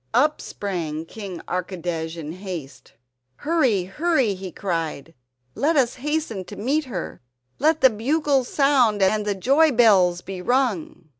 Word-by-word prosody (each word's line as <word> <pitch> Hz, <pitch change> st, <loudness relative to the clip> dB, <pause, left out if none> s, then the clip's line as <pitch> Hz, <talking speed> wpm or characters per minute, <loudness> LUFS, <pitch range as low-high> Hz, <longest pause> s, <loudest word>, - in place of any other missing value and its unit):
Up 300 Hz, +5 st, +3 dB
sprang 165 Hz, -6 st, -4 dB
King 190 Hz, -2 st, -8 dB
Archidej 175 Hz, -2 st, -3 dB
in 155 Hz, -2 st, -6 dB
haste: 175 Hz, -7 st, -8 dB, 0.4 s
"Hurry, 260 Hz, -, +1 dB
hurry," 265 Hz, -, +1 dB
he 185 Hz, -1 st, -7 dB
cried. 165 Hz, -4 st, -4 dB, 0.4 s
"Let 315 Hz, +4 st, +1 dB
us 255 Hz, -4 st, +3 dB
hasten 295 Hz, -9 st, -2 dB
to -, -, -9 dB
meet 280 Hz, +8 st, 0 dB
her! 195 Hz, -10 st, -6 dB, 0.4 s
Let 315 Hz, +2 st, +2 dB
the 260 Hz, -1 st, +7 dB
bugles 270 Hz, +3 st, +1 dB
sound 250 Hz, -9 st, +3 dB
and 210 Hz, +2 st, +2 dB
the 205 Hz, -, 0 dB
joy 280 Hz, -, +4 dB
bells 195 Hz, -8 st, +4 dB
be 190 Hz, -1 st, -7 dB
rung!" 235 Hz, -, -1 dB
205 Hz, 140 wpm, -23 LUFS, 180-275 Hz, 0.4 s, the